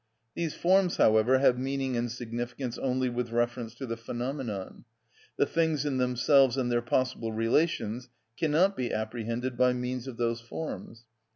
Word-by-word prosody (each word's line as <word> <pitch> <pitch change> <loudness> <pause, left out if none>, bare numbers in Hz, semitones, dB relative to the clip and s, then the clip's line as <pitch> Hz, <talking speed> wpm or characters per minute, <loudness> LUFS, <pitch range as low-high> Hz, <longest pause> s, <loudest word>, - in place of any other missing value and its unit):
These 165 -3 -3
forms, 185 0 +3
however, 110 +4 +5
have 130 -2 +3
meaning 135 -1 -1
and 120 0 -1
significance 120 +1 -5
only 130 -1 0
with 120 -1 -2
reference 120 -1 -1
to 135 - -6
the 115 -2 -3
phenomenon; 120 -3 -5 0.5
the - - +4
things 160 -1 0
in 140 -3 0
themselves 125 +1 +4
and 125 -2 0
their 120 0 +2
possible 125 -2 -1
relations 120 0 0 0.3
cannot 170 - +2
be 125 -2 -2
apprehended 115 +3 -3
by 125 0 +4
means 125 0 -3
of 125 -3 -7
those 115 -1 -1
forms. 115 -2 -7
125 Hz, 155 wpm, -29 LUFS, 120-135 Hz, 0.5 s, however